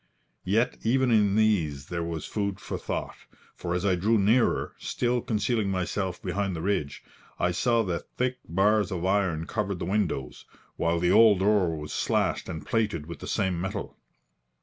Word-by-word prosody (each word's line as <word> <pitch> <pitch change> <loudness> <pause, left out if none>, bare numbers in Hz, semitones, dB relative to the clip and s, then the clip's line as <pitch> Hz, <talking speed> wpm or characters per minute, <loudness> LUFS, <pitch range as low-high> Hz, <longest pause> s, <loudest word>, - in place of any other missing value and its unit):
Yet 110 +6 +2
even 130 +2 +2
in 105 -3 +4
these 85 -11 +1
there 85 +2 -3
was 85 -2 -4
food 100 -3 -2
for - - -5
thought, - - -4 0.4
for 85 0 -3
as 90 +2 -1
I 95 - +3
drew 105 +6 +2
nearer, 110 +4 +2
still 120 0 -1
concealing 110 -1 0
myself 95 0 -2
behind 95 0 -2
the 80 - -4
ridge, 80 -8 -1 0.3
I 90 - +1
saw 115 +5 +2
that 90 -4 -4
thick 125 0 0
bars 100 +3 +3
of 90 -1 -2
iron 95 -5 +1
covered 100 -2 -2
the - - -4
windows, 90 -9 -2 0.3
while 85 +1 +1
the 90 +1 +2
old 110 -3 +7
door 95 -3 +2
was 75 0 -6
slashed - - 0
and 80 - -6
plated 105 -9 0
with 85 -1 -8
the - - -8
same 90 -3 0
metal. 100 +2 -4
95 Hz, 170 wpm, -27 LUFS, 85-110 Hz, 0.4 s, old